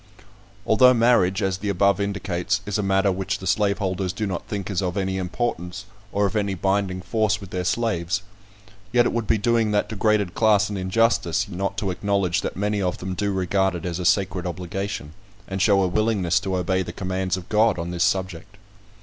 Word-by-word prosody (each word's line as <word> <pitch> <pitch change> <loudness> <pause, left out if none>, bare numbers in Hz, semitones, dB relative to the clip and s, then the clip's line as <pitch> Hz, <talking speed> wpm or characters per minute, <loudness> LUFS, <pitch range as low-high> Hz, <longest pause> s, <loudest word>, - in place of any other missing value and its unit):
Although 125 +3 +6
marriage, 110 -5 +3
as 95 -1 -1
the 105 +1 -3
above 100 0 +2
indicates, 100 -3 -1
is 105 0 -2
a - - +2
matter 95 0 +2
which 95 0 -2
the 95 - -9
slaveholders 100 -2 0
do 105 +3 -3
not 95 -3 -4
think 100 -1 -4
is 95 - 0
of 90 +1 -2
any 95 -1 -1
importance, 90 -1 -3 0.3
or 100 +1 +1
of 100 - -2
any 100 -2 0
binding 95 0 -1
force 105 +2 +1
with 100 -3 -11
their 90 -1 -2
slaves; 95 -3 -1 0.7
yet 120 0 +4
it - - 0
would 115 -2 -2
be 110 - +3
doing 115 +1 +2
that 105 0 0
degraded 105 -3 +1
class 105 -2 +3
an - - -3
injustice, 95 -1 +1
not 100 +1 -3
to 100 -4 -1
acknowledge 100 -2 0
that - - -4
many 105 0 0
of 90 -2 -1
them 95 0 -5
do 100 +2 -1
regard 95 0 +1
it 85 - -6
as 90 0 -3
a - - -3
sacred 90 -1 +1
obligation, 90 -2 -5 0.3
and 95 0 -3
show 100 -1 +4
a - - +2
willingness 100 -2 +1
to 95 -2 -2
obey 95 +1 0
the - - -5
commands 95 -1 -2
of 90 -1 -9
God 110 -1 +3
on 85 +1 -4
this 85 -1 0
subject. 95 0 -2
95 Hz, 200 wpm, -23 LUFS, 90-105 Hz, 0.7 s, Although